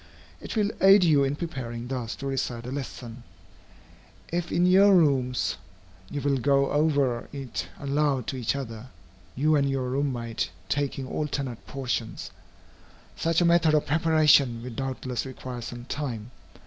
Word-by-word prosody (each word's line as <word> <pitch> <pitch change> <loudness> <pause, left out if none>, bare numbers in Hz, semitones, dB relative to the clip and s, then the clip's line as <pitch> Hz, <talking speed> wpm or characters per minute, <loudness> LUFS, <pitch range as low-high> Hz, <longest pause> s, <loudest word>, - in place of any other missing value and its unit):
It - - -6
will 210 -1 +1
aid 195 0 +8
you 150 -5 +4
in 135 +1 0
preparing 125 -8 -5
thus 125 -3 -4
to 140 - -8
recite 130 -3 -2
a 125 - -5
lesson, 120 -2 -6 1.1
if 175 0 -1
in 175 - +3
your 195 +2 +6
rooms 125 - +2 0.5
you 145 - -3
will 140 -1 +1
go 140 +1 +2
over 145 -5 +1
it 135 -4 -5
aloud 140 -3 0
to - - -3
each 125 0 -1
other, 115 -3 -6 0.5
you 155 +4 +3
and 140 -1 +2
your 135 -2 -1
room 140 +1 0
mate, 115 -7 -3 0.2
taking 140 -2 -1
alternate 140 -5 -4
portions. 125 -4 -4 0.8
Such 165 +1 +1
a - - +4
method 170 -2 +4
of 150 - +2
preparation 150 -6 +4
will 125 - -6
doubtless 130 0 -3
require 130 -2 -7
some 120 +1 -7
time. 125 -5 -4
135 Hz, 150 wpm, -26 LUFS, 125-150 Hz, 1.1 s, aid